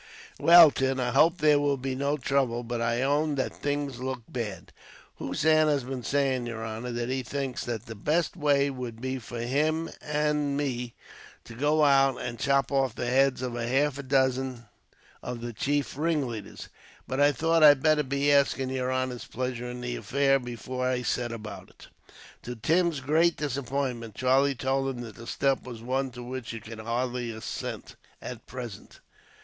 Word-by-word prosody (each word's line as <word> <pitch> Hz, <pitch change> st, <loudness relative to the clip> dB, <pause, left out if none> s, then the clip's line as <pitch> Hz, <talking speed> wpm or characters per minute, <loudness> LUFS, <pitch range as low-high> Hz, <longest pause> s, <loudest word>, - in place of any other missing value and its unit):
"Well, 170 Hz, -2 st, +9 dB
Tim, 135 Hz, -1 st, 0 dB
I 125 Hz, -1 st, 0 dB
hope 160 Hz, +7 st, +4 dB
there 150 Hz, -3 st, +4 dB
will 145 Hz, -1 st, +1 dB
be 130 Hz, 0 st, -3 dB
no 140 Hz, +3 st, 0 dB
trouble; 130 Hz, -3 st, 0 dB
but 120 Hz, 0 st, -3 dB
I 115 Hz, +2 st, +1 dB
own 145 Hz, +2 st, +1 dB
that 130 Hz, -, -2 dB
things 145 Hz, -3 st, -3 dB
look 130 Hz, -2 st, -4 dB
bad." 105 Hz, -8 st, -6 dB, 0.5 s
"Hossein 155 Hz, 0 st, +2 dB
has 145 Hz, -3 st, +1 dB
been 130 Hz, 0 st, -5 dB
saying, 130 Hz, -1 st, 0 dB
yer 115 Hz, -1 st, -5 dB
honor, 115 Hz, +2 st, -5 dB
that 120 Hz, 0 st, -3 dB
he 130 Hz, 0 st, -1 dB
thinks 135 Hz, +1 st, -4 dB
that 115 Hz, -2 st, -4 dB
the 115 Hz, -, -7 dB
best 155 Hz, +12 st, 0 dB
way 140 Hz, -3 st, +2 dB
would 125 Hz, -4 st, -6 dB
be 130 Hz, +1 st, -3 dB
for 120 Hz, 0 st, -7 dB
him 155 Hz, +6 st, 0 dB
and 150 Hz, -1 st, 0 dB
me 125 Hz, -4 st, -3 dB, 0.5 s
to 115 Hz, -, -11 dB
go 150 Hz, +5 st, +2 dB
out 135 Hz, -2 st, +4 dB
and 120 Hz, -1 st, -5 dB
chop 140 Hz, -1 st, +2 dB
off 135 Hz, -4 st, +1 dB
the -, -, -3 dB
heads 130 Hz, +1 st, +2 dB
of 125 Hz, -2 st, -3 dB
half 135 Hz, +4 st, 0 dB
a -, -, -2 dB
dozen 130 Hz, -2 st, 0 dB, 0.6 s
of 125 Hz, -1 st, -5 dB
the 120 Hz, 0 st, -5 dB
chief 145 Hz, +5 st, -1 dB
ringleaders. 140 Hz, -, -2 dB, 0.4 s
But 130 Hz, -, -2 dB
I 145 Hz, 0 st, +6 dB
thought 165 Hz, +4 st, +1 dB
I'd 145 Hz, -3 st, +7 dB
better 155 Hz, -1 st, +4 dB
be 140 Hz, +1 st, +1 dB
after 140 Hz, -1 st, +4 dB
asking 130 Hz, -, -3 dB
yer 130 Hz, -1 st, -1 dB
honor's 130 Hz, -1 st, -2 dB
pleasure 125 Hz, -1 st, -4 dB
in 125 Hz, 0 st, -6 dB
the 120 Hz, 0 st, -3 dB
affair, 135 Hz, +5 st, +2 dB
before 125 Hz, +1 st, -4 dB
I 125 Hz, -1 st, -1 dB
set 120 Hz, 0 st, -1 dB
about 105 Hz, -4 st, -8 dB
it." -, -, -16 dB, 0.5 s
To 125 Hz, +1 st, -6 dB
Tim's 165 Hz, +5 st, +1 dB
great 160 Hz, +5 st, +3 dB
disappointment, 130 Hz, -5 st, -3 dB
Charlie 135 Hz, +3 st, +3 dB
told 135 Hz, +2 st, 0 dB
him 120 Hz, -, -6 dB
that 115 Hz, -2 st, -9 dB
the 115 Hz, -, -11 dB
step 135 Hz, -1 st, +1 dB
was 120 Hz, -3 st, -9 dB
one 130 Hz, +2 st, -1 dB
to 125 Hz, 0 st, -8 dB
which 125 Hz, -1 st, -6 dB
he 115 Hz, -, -5 dB
could 110 Hz, +1 st, -10 dB
hardly 120 Hz, +2 st, -2 dB
assent, 110 Hz, -1 st, -6 dB, 0.2 s
at 120 Hz, -2 st, -8 dB
present. 120 Hz, -5 st, -8 dB
130 Hz, 185 wpm, -27 LUFS, 120-140 Hz, 0.6 s, Well